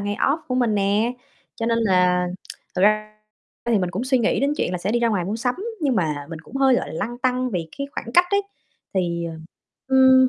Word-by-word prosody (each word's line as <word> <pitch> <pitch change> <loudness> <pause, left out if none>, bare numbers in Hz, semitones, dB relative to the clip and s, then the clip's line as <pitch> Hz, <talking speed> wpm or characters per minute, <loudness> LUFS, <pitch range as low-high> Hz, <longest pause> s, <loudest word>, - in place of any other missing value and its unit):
ngày 205 0 -2
off 285 +4 +2
của 255 - -1
mình 240 -4 +2
nè. 205 +4 +2 0.4
Cho 230 - -3
nên 230 0 +2
là 180 -4 +3 0.5
thật 185 - 0
ra 215 +1 +3 0.6
thì 220 - +4
mình 180 -2 -1
cũng 205 +9 -3
suy 260 -1 +2
nghĩ 230 - +1
đến 280 +2 +2
chuyện 180 - -1
là 180 - -1
sẽ 195 +5 -2
đi 240 - +3
ra 235 - +3
ngoài 200 -6 0
mua 205 +5 -2
sắm, 245 +2 0 0.3
nhưng 275 -4 +1
mà 150 -5 -1
mình 160 - -6
cũng 225 +11 -9
hơi, 270 -1 +4
gọi - - -1
là, - - -7
lăn 240 +1 -8
tăn 255 0 0
vì 170 -4 -3
cái 280 - -2
khoảng 235 - -5
cách 355 0 +6
ấy. 400 0 +3 0.5
Thì, 170 -2 0
ờ, 165 -1 -5 0.5
ừm, 260 -1 +6
220 Hz, 240 wpm, -23 LUFS, 180-255 Hz, 0.6 s, cách